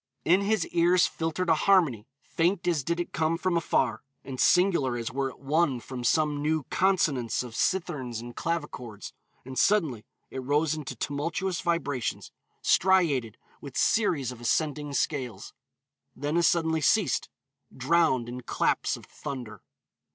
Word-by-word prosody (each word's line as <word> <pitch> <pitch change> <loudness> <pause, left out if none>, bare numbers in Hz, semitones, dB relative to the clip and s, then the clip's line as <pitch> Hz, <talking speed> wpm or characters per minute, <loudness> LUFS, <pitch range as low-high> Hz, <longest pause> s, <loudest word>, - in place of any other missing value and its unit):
In 185 +4 +4
his 205 -2 +1
ears 175 +1 +4
filtered 165 +2 -2
a 165 - +5
harmony, 155 - +2 0.2
faint 175 +2 0
as 165 -6 +1
did 170 +4 -1
it 175 - -4
come 160 +3 +1
from 185 0 0
afar, 130 -8 +1 0.2
and 130 -2 -7
singular 170 -9 +3
as 115 -1 -4
were 135 +1 -1
it - - -14
won 140 -1 +1
from 125 +1 -7
some 150 +1 +1
new 155 0 0
consonance 150 - +1
of 120 -2 -9
citherns 145 -11 -1
and 120 +1 -9
clavichords, 135 -10 -4 0.3
and 130 0 -4
suddenly 160 - +2 0.3
it 130 - -5
rose 145 +4 +1
into 145 -4 -5
tumultuous 165 - -2
vibrations, 155 -8 -2 0.3
striated 155 - +2 0.2
with 140 -3 -8
series 165 - +2
of 120 -2 -11
ascending 145 +3 -1
scales. 130 -8 -2 0.6
Then 145 +4 -2
as 170 -2 +4
suddenly 160 -1 +1
ceased, 170 - +2 0.4
drowned 130 -3 +2
in 125 +1 -6
claps 120 - 0
of - - -14
thunder. 125 -5 -7
150 Hz, 145 wpm, -27 LUFS, 130-170 Hz, 0.6 s, a